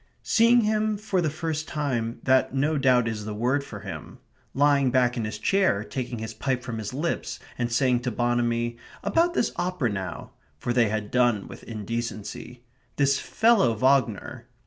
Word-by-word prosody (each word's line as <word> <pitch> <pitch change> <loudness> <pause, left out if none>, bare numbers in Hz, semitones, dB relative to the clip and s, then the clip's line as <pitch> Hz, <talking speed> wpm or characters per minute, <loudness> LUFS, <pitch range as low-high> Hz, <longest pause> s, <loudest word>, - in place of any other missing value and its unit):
Seeing 235 +1 +5
him 215 0 +1
for 200 -3 -1
the 160 - +1
first 155 0 -3
time 120 -6 -2
that 130 0 +3
no 145 +4 +1
doubt 125 -3 +4
is 110 -2 -3
the 105 0 -5
word 125 +6 +1
for - - -9
him. - - -8 0.4
Lying 140 -1 +4
back 125 -1 +2
in 115 -3 -2
his 105 0 -4
chair, 190 - +2
taking 125 +1 -4
his 110 0 -5
pipe 125 +3 -2
from 115 -3 -5
his 105 -1 -4
lips, 150 +6 -2 0.2
and 120 -1 -2
saying 125 +1 +2
to 125 +1 -2
Bonamy: 120 0 0 0.3
"About 345 +1 +2
this - - +1
opera 175 - -1
now" 95 -4 -5 0.3
(for 120 +10 -2
they 120 -3 +3
had 110 -1 -3
done 120 -5 +2
with - - -10
indecency). 115 +2 -5 0.3
"This 140 -1 +2
fellow 220 - +3
Wagner" 130 -3 +1
125 Hz, 170 wpm, -26 LUFS, 115-145 Hz, 0.4 s, Seeing